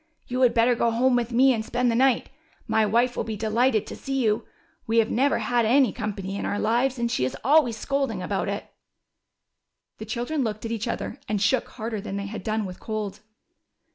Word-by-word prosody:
You 250 +1 -2
had 250 -2 +4
better 235 +1 +4
go 235 0 +1
home 245 +3 +2
with 240 0 0
me 260 +3 +5
and 220 -2 -2
spend 245 +2 0
the - - 0
night. 260 0 +2 0.4
My 220 -1 +2
wife 240 +4 +2
will - - -1
be 220 -2 -5
delighted 220 +1 +1
to - - -7
see 270 - -5
you. 215 -1 0 0.4
We 225 +1 +1
have 225 -1 +3
never 275 +4 +2
had 240 -1 +1
any 255 +4 +4
company 200 -4 -4
in - - -4
our 205 - -1
lives, 245 +5 +1
and 235 -1 -1
she 125 - 0
is 130 +1 -2
always 260 -4 +4
scolding 275 +3 -2
about - - -2
it." - - -3 1.3
The 220 - -6
children 245 +7 -2
looked 215 -1 -3
at 225 - -3
each 230 0 -3
other 245 - -4
and 210 -1 0
shook 230 +5 +2
harder 220 -3 -5
than 200 -1 -5
they 200 - -3
had 210 +2 -6
done 215 -1 -1
with 180 -1 -8
cold. 215 -3 -4
230 Hz, 215 wpm, -25 LUFS, 215-250 Hz, 1.3 s, me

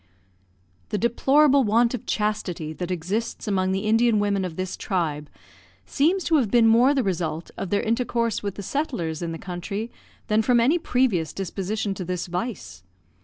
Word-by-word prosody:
The - - -1
deplorable 270 +5 +4
want 230 +2 +3
of 250 - -5
chastity 185 -7 -2
that 180 +2 -5
exists 185 +7 -3
among 190 -2 +1
the 190 +1 0
Indian 225 +1 +3
women 205 -1 +1
of 180 -3 -4
this 185 +1 -3
tribe 155 -6 -2 0.6
seems 340 - +1
to 320 -1 +3
have 245 -8 +1
been 235 +1 +4
more 245 +5 +5
the 265 - +2
result 170 -4 -3
of 195 - -5
their 205 - +1
intercourse 230 -1 0
with 200 -2 -4
the 200 - -7
settlers 185 - -2
in 170 -1 -3
the 165 - -5
country 195 +6 -5 0.3
than 215 +1 +2
from 240 +2 +3
any 280 +9 +3
previous 235 - 0
disposition 195 +2 -3
to 190 - -5
this 180 0 -3
vice. 175 - -5
205 Hz, 170 wpm, -24 LUFS, 180-235 Hz, 0.6 s, more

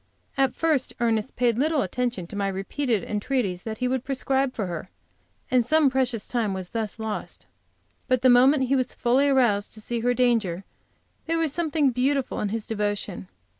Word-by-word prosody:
At 270 -2 +1
first 310 -5 +1
Ernest 230 0 0
paid 240 -2 +1
little 300 -1 +2
attention 240 -1 -2
to 175 - -10
my 200 -1 0
repeated 200 +3 -1
entreaties 210 -4 -1
that 220 +1 -5
he 250 - -1
would 255 -1 -1
prescribe 270 0 0
for 210 - -2
her, 175 0 -6 0.6
and 250 -1 +4
some 305 +1 +3
precious 255 -4 0
time 220 -5 -1
was 185 -1 -6
thus 225 -2 -3
lost. 220 -1 -5 0.6
But 255 -2 +1
the - - +6
moment 260 +3 +6
he 275 - +2
was 255 -1 -1
fully 255 +4 +2
aroused 235 -7 +2
to 220 - -7
see 235 +2 -3
her 245 +2 +1
danger, 225 -8 +1 0.6
there 330 0 +1
was 320 -4 0
something 310 -4 +1
beautiful 265 +2 0
in 210 - -1
his 220 +1 -3
devotion. 205 - -3
245 Hz, 180 wpm, -25 LUFS, 210-270 Hz, 0.6 s, the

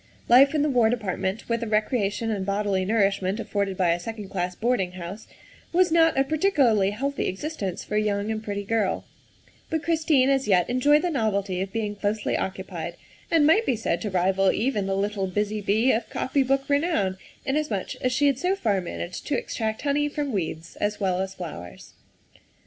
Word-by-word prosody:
Life 275 +5 +6
in 295 - +2
the - - +2
War 240 -4 +4
Department, 200 -3 -2
with 230 0 0
the 230 - -4
recreation 215 0 0
and 200 -3 -2
bodily 200 -1 0
nourishment 195 -1 +1
afforded 200 -4 -2
by 180 -3 +3
a 170 - 0
second 210 +1 -7
class 180 -1 -2
boarding 220 -6 0
house, 185 +4 -8 0.4
was 355 0 +3
not 325 -2 +4
a 270 - +5
particularly 275 - +2
healthy 275 +7 -2
existence 195 - -4
for 210 - -2
a - - +3
young 205 0 -1
and 215 0 -3
pretty 205 -1 -3
girl, 210 -2 0 0.6
but 320 -1 -1
Christine 315 -5 +3
as 270 -2 +2
yet 180 -4 +3
enjoyed 290 +5 +4
the 355 - 0
novelty 200 - 0
of 190 0 -4
being 215 -2 -2
closely 205 +1 -1
occupied, 185 -3 -4 0.3
and 325 -3 +4
might 390 +9 +5
be 250 - +2
said 210 -6 -1
to 210 - -2
rival 190 +1 +2
even 215 -4 -1
the 195 0 0
little 200 -1 -1
busy 210 +3 -1
bee 220 +6 +3
of 225 +1 -1
copy 275 +1 0
book 270 +1 +1
renown, 285 - +1 0.3
inasmuch 270 -8 -1
as 255 - -1
she 265 +3 +2
had 275 -2 +2
so 365 +4 +1
far 210 - 0
managed 175 0 -6
to 290 - +1
extract 220 0 -3
honey 295 0 +1
from 290 -1 -3
weeds 165 -4 -4
as 210 0 -1
well 185 -3 0
as 190 0 -4
flowers. 90 - -9
215 Hz, 190 wpm, -25 LUFS, 195-270 Hz, 0.6 s, Life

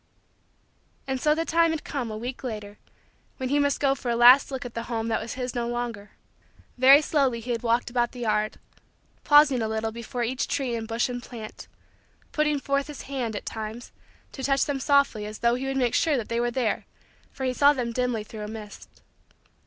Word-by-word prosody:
And 265 -1 -3
so 300 0 +3
the 330 +1 -1
time 335 0 +3
had 320 -2 -2
come, 265 -5 -4
a 215 - -5
week 245 +4 -6
later, 210 -4 -6 0.6
when 260 -2 -3
he 290 +2 +2
must 285 -1 +1
go 275 -1 +3
for 260 -2 -5
a 235 - +1
last 245 +4 +7
look 265 -2 -5
at 240 - -7
the 230 0 -4
home 225 -1 -2
that 220 - 0
was 235 - -6
his 250 -1 -4
no 240 -1 -2
longer. 235 -4 -4 0.7
Very 270 +4 +7
slowly 275 -6 +1
he 240 +2 -5
had 230 -1 -1
walked 235 +1 0
about 240 -1 +1
the 250 - -9
yard; 215 -2 0 0.7
pausing 290 -4 +6
a 220 - 0
little 220 0 -2
before 235 +2 -4
each 250 +2 -1
tree 265 -4 -1
and 225 -1 -3
bush 230 +1 0
and 245 -1 -5
plant; 225 -3 -9 0.6
putting 300 -1 +1
forth 275 +1 -1
his 295 -2 -8
hand, 255 -5 -3
at - - -5
times, 220 +2 -6 0.4
to 270 - -8
touch 275 0 +2
them 285 -2 -2
softly 280 -7 +2
as 215 0 -7
though 235 0 +2
he 255 +2 -2
would 270 0 -2
make 245 -3 +1
sure 315 -4 +2
that 230 - -4
they 230 0 0
were 240 0 +1
there 240 -3 -1 0.4
for 265 - -7
he 255 -1 0
saw 285 +3 +6
them 250 -5 -2
dimly 245 -2 -1
through 215 0 -9
a - - -5
mist. 215 -1 -10
245 Hz, 215 wpm, -26 LUFS, 230-275 Hz, 0.7 s, last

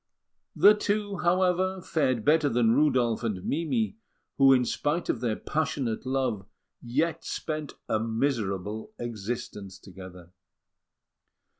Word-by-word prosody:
The 210 - +7
two, 205 -1 -1
however, 185 +1 +1
fared 130 -10 0
better 155 -1 +4
than 115 -2 +3
Rudolf 125 -5 +2
and 100 -6 -3
Mimi, 210 - -1 0.4
who, 135 0 +7
in 125 -2 +4
spite 150 +7 -1
of 115 - -1
their 115 -3 0
passionate 135 -6 -2
love, 130 -7 -1 0.3
yet 155 +7 -1
spent 155 -2 -4
a 110 - +1
miserable 110 -3 -2
existence 110 -3 -5
together. 90 -2 -12
130 Hz, 115 wpm, -27 LUFS, 110-160 Hz, 0.4 s, The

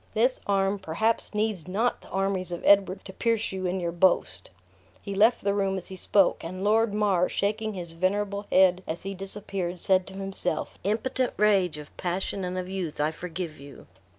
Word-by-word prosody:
This - - +2
arm 195 0 +1
perhaps 210 +6 -1
needs 210 -5 -1
not 220 +6 0
the - - -16
armies 195 -2 -1
of 175 - -5
Edward 200 -1 +4
to 190 - -8
pierce 230 +1 0
you 190 -1 -3
in 185 +1 -1
your 170 -1 -2
boast!" 170 - +1 0.5
He 200 - -6
left 220 +5 +4
the 200 0 +2
room 195 -1 0
as 185 - -7
he 190 - -7
spoke; 195 +1 +2
and 185 +3 -5
Lord 220 +1 +3
Mar, 200 -4 +2
shaking 215 +1 -1
his 175 -2 -6
venerable 200 +4 -1
head 185 -1 +5
as 160 - -4
he 195 +1 -4
disappeared, 195 -2 -4
said 185 +1 +3
to 195 - -9
himself: 195 -4 -3
"Impotent 250 +5 0
rage 195 -6 +3
of 150 -1 -11
passion 185 +2 -2
and 180 0 -3
of 180 0 -3
youth, 185 -5 -4
I 150 +1 +2
pity - - -15
and - - -16
forgive 170 -3 -6
you." 140 0 -12
190 Hz, 200 wpm, -27 LUFS, 180-205 Hz, 0.5 s, head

